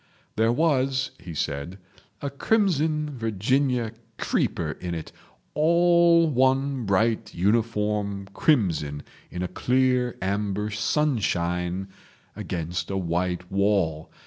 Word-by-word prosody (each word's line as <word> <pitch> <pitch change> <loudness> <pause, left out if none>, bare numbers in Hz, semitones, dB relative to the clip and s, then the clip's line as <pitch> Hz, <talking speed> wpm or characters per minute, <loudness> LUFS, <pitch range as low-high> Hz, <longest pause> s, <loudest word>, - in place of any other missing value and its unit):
"There 110 +1 +3
was," 130 -2 +1
he 85 -2 -9
said, 75 +6 -3 0.5
"a 140 - -2
crimson 155 -4 +1
Virginia 115 +3 0 0.3
creeper - - -1
in 90 -1 -3
it—all 170 - +2
one 135 -1 +1
bright 110 +2 +1
uniform 105 0 0
crimson 80 - +1 0.3
in 90 0 -4
a - - -1
clear 125 +2 +1
amber 100 +2 -1
sunshine 95 - 0 0.5
against 85 0 -4
a 95 - -1
white 90 0 -2
wall. 95 -6 +1
105 Hz, 95 wpm, -25 LUFS, 90-135 Hz, 0.5 s, There